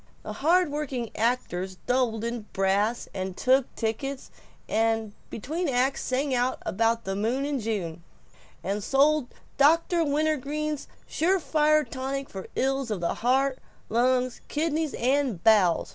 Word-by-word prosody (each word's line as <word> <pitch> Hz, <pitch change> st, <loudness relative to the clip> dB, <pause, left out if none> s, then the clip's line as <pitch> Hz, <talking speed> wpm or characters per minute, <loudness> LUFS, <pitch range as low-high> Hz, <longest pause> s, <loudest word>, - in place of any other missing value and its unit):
The -, -, -5 dB
hard 345 Hz, +1 st, +2 dB
working 265 Hz, -6 st, -3 dB
actors 190 Hz, -6 st, -1 dB
doubled 245 Hz, -3 st, +1 dB
in 235 Hz, -2 st, -4 dB
brass, 200 Hz, +4 st, +1 dB
and 190 Hz, -1 st, -4 dB
took 260 Hz, 0 st, +2 dB
tickets; 260 Hz, +5 st, -3 dB, 0.4 s
and 225 Hz, -1 st, 0 dB, 0.2 s
between 315 Hz, -, -3 dB
acts 260 Hz, +2 st, +1 dB
sang 265 Hz, +2 st, -1 dB, 0.3 s
about 230 Hz, +3 st, +1 dB
the 195 Hz, -1 st, -3 dB
moon 235 Hz, +7 st, 0 dB
in 285 Hz, -2 st, -1 dB
June, 185 Hz, -7 st, -3 dB, 0.6 s
and 200 Hz, +3 st, -2 dB
sold 285 Hz, +2 st, +3 dB, 0.3 s
Dr. 330 Hz, +4 st, +4 dB
Wintergreen's 305 Hz, 0 st, -1 dB, 0.2 s
Surefire 305 Hz, -3 st, +2 dB
Tonic 270 Hz, +1 st, -4 dB
for 190 Hz, -1 st, -7 dB
Ills 270 Hz, -1 st, 0 dB
of 210 Hz, -4 st, -2 dB
the 170 Hz, -, 0 dB
Heart, 260 Hz, +2 st, +1 dB, 0.3 s
Lungs, 250 Hz, +1 st, +1 dB
Kidneys, 310 Hz, -1 st, -1 dB
and 255 Hz, -7 st, 0 dB
Bowels. 200 Hz, -6 st, +4 dB
255 Hz, 130 wpm, -27 LUFS, 220-290 Hz, 0.6 s, Dr